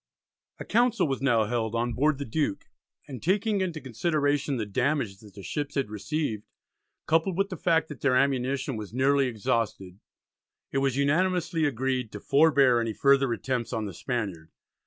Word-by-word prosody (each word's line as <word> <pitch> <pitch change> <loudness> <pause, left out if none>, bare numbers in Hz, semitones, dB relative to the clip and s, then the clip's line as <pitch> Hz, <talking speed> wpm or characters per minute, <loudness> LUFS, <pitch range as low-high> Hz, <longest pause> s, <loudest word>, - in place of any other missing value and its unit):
A - - -7
Council 240 -3 +2
was 135 -2 -2
now 120 -5 +3
held 115 0 -2
on 120 +1 0
board 150 +3 +2
the 140 - -4
Duke, 140 -3 -2 0.4
and 130 -4 -8
taking 200 +3 +1
into 175 -4 -2
consideration 145 +1 0
the 110 - -2
damage 120 -1 -1
that 105 -3 -16
the 100 - -10
ships 145 +5 -4
had 135 -7 -1
received, 110 0 -3 0.6
coupled 165 +3 +1
with 195 0 +1
the 185 - -5
fact 165 -1 +1
that 150 - -9
their 135 -2 +2
ammunition 135 0 0
was 105 +1 -7
nearly 135 +1 +3
exhausted, 105 -4 -2 0.7
it 135 - 0
was 135 -1 0
unanimously 165 +3 +1
agreed 130 -3 -1
"to 105 - -6
forbear 140 -3 +4
any 115 -1 -2
further 140 +1 +3
attempts" 120 0 -2
on 110 -1 -2
the 100 - -6
Spaniard. 95 -8 -4
135 Hz, 170 wpm, -27 LUFS, 115-150 Hz, 0.7 s, forbear